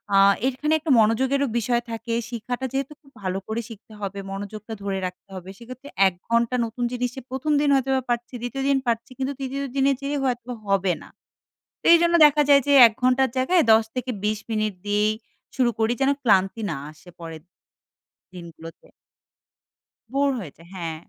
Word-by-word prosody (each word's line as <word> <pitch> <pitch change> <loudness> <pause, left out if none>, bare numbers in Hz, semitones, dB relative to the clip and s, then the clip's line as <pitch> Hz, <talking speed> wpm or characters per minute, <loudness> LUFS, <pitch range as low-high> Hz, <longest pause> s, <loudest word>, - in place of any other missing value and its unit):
আ - - +6 0.3
এর 265 - +2
এখানে 300 +1 0
একটা 315 -1 -2
মনোযোগেরও 260 +6 +2
বিষয় 235 +1 0
থাকে। 230 +1 -4 0.2
শিখাটা 245 +2 -4
যেহেতু 275 +2 -2
খুব 275 - -22
ভালো 185 0 -2
করে 220 +2 -2
শিখতে 220 0 -13
হবে, 200 0 -4
মনোযোগটা 210 +3 -7
ধরে 195 -1 -2
রাখতে 180 +2 -8
হবে, 185 0 -8
সেক্ষেত্রে 255 +4 -11 0.2
১ 190 - -1 0.2
ঘণ্টা 235 +1 +2
নতুন 230 +2 -5
জিনিসে 250 +1 -3
১ম 270 +4 -2
দিন 295 - +2
হয়তোবা 265 0 +1
পারছি, 240 +1 -2
২য় 265 +3 -4
দিন 275 - +3
পারছি, 230 +1 -1
কিন্তু 270 +1 -2
৩য় 275 +1 -4
দিনে 275 0 +3
যেয়ে 285 +1 -2
হয়তোবা 245 -1 -2
হবে 195 -2 +2
না। - - -13 0.8
এইজন্য 340 0 +5
দেখা 295 0 +3
যায় 280 -1 +7
যে 285 - +2
১ 225 - 0
ঘণ্টার 255 +1 +3
জায়গায় 325 +7 +3
১০-২০ 220 -2 0
মিনিট 215 -2 -1
দিয়েই 210 +1 +2 0.4
শুরু 250 -2 +3
করি, 225 +1 +2
যেন 270 +1 +3
ক্লান্তি 195 -1 +2
না 155 - -3
আসে 155 +3 -18
পরের 165 -2 -8
দিন 180 - -49 0.8
দিনগুলোতে। 165 -2 -11 1.3
বোর 280 +1 +2
হয়েছে 165 -5 -10
হ্যাঁ। 165 -3 -4
235 Hz, 170 wpm, -23 LUFS, 205-270 Hz, 1.3 s, যায়